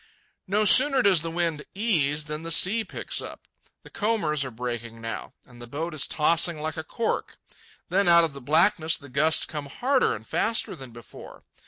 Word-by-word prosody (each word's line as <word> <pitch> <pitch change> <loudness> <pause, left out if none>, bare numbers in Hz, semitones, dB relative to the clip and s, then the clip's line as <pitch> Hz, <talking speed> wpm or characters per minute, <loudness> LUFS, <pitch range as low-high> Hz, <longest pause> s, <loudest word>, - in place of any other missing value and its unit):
No 210 +3 +1
sooner 265 +4 +6
does 190 -5 +4
the 165 - -5
wind 165 -3 -2
ease 155 -9 0
than 150 +1 -6
the 165 - -7
sea 200 +7 +4
picks - - -4
up. - - -10 0.4
The - - -15
combers 185 -10 0
are 130 - -5
breaking 120 -1 -6
now, 115 +3 -7
and 120 -2 -17
the 120 - -10
boat 160 +7 -5
is 150 - +1
tossing 165 +1 +2
like 155 +1 -4
a 160 - -5
cork. 225 +7 -4 0.5
Then 190 +2 +1
out 170 -1 +6
of 160 -3 -2
the 140 - -10
blackness 155 +3 +2
the 140 -2 -14
gusts 150 +5 +2
come 150 -2 -7
harder 260 - 0
and 110 0 -11
faster 225 - -1
than 130 -2 -11
before. 120 -1 -14
160 Hz, 190 wpm, -25 LUFS, 140-195 Hz, 0.5 s, sooner